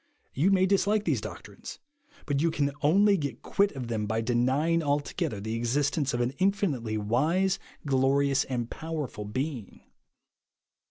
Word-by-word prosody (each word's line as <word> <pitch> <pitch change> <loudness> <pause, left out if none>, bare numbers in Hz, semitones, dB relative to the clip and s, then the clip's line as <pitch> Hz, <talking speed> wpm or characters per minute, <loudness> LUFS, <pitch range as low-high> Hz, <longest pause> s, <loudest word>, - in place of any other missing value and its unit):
You 155 +9 +2
may 190 -1 +4
dislike 200 +2 +2
these - - +1
doctrines, - - -9 0.5
but 140 -1 0
you 165 - +3
can 145 -3 0
only 200 +7 +4
get 145 -4 -5
quit 200 0 +2
of 130 -4 -5
them 110 -3 -2
by 110 +2 0
denying 130 +8 +1
altogether 145 -7 -1
the 110 +2 -4
existence 140 +5 0
of 120 - -1
an 120 +1 0
infinitely 175 - 0
wise, 160 - +1 0.3
glorious, 135 0 +2
and 120 -3 -3
powerful 150 -8 -5
Being. 125 0 -4
140 Hz, 145 wpm, -28 LUFS, 120-165 Hz, 0.5 s, may